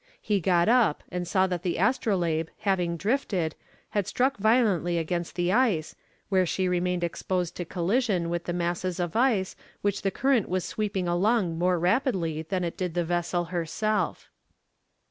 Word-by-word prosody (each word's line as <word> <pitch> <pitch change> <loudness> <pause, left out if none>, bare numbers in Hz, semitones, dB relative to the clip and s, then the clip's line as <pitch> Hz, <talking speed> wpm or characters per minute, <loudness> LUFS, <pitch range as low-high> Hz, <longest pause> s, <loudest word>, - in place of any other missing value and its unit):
He 205 -2 0
got 175 -1 +2
up, 235 -9 +3
and 180 -1 -3
saw 190 0 +3
that 180 -3 -2
the 180 -1 -1
Astrolabe, 175 -7 +1
having 180 -4 0
drifted, 195 - 0 0.4
had 205 -3 0
struck 260 +2 +1
violently 200 -6 +2
against 170 +1 -2
the 175 0 +1
ice, 215 -10 +2 0.4
where 190 -2 +3
she 185 +3 0
remained 180 0 0
exposed 175 +1 -2
to 175 - -3
collision 185 +1 0
with 170 0 -2
the - - -2
masses 175 +1 -2
of 175 -2 -2
ice 225 -6 +2 0.3
which 200 -1 0
the 195 - +1
current 255 +1 +1
was 185 0 -1
sweeping 200 -4 -2
along 175 -1 +1
more 180 0 +2
rapidly 175 - +1
than 180 +3 -2
it 170 - -3
did 180 -3 -3
the 175 -1 +1
vessel 175 +1 -1
herself. 205 +6 -1
180 Hz, 165 wpm, -27 LUFS, 175-205 Hz, 0.4 s, up